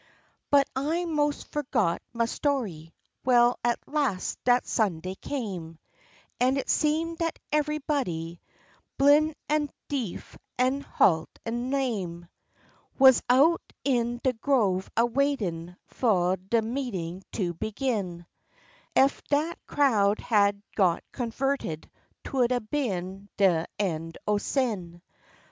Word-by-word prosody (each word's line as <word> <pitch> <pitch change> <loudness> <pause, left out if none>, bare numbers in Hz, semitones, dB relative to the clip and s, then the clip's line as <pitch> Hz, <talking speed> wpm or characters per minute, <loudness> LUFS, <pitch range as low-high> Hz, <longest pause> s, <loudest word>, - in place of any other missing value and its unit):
But 280 -1 +5
I 315 +6 0
mos' 295 -3 0
forgot 240 - -1
ma 235 -1 0
story, 225 - -2 0.3
well 245 -1 +4
at 240 0 +2
las' 275 -11 -1
dat 245 0 +4
Sunday 185 -5 -1
came 190 - -5 0.6
And 255 +2 +3
it 275 - -1
seemed 320 +2 0
dat 330 -1 -1 0.2
evehbody, 280 - -1 0.6
blin' 295 +2 +5
an' 300 -1 +1 0.2
deef, 250 -10 -4 0.2
an' 260 +3 +2
halt 160 - +2 0.2
an' 240 +2 -2
lame, 200 -11 -2 0.7
Wuz 265 -2 +7
out 290 +7 +5 0.2
in 240 -3 0
de 260 - +2
grove 220 -7 +1
a 230 - +5
waitin' 210 -10 -1
fu' 185 -7 +1
de 195 +5 0
meetin' 210 -8 -4
to 180 -5 -1
begin; 200 - -3 0.7
Ef 270 +1 +4
dat 305 +4 0
crowd 215 -8 +3
had 200 -2 +2
got 180 -5 +2
converted 245 - -3 0.3
'twould 255 -3 +1
a 250 - +2
been 200 -6 -3
de 180 -5 +3
end 165 -4 -2
o' 210 -1 +2
sin. 195 -10 -2
235 Hz, 115 wpm, -27 LUFS, 185-275 Hz, 0.7 s, Wuz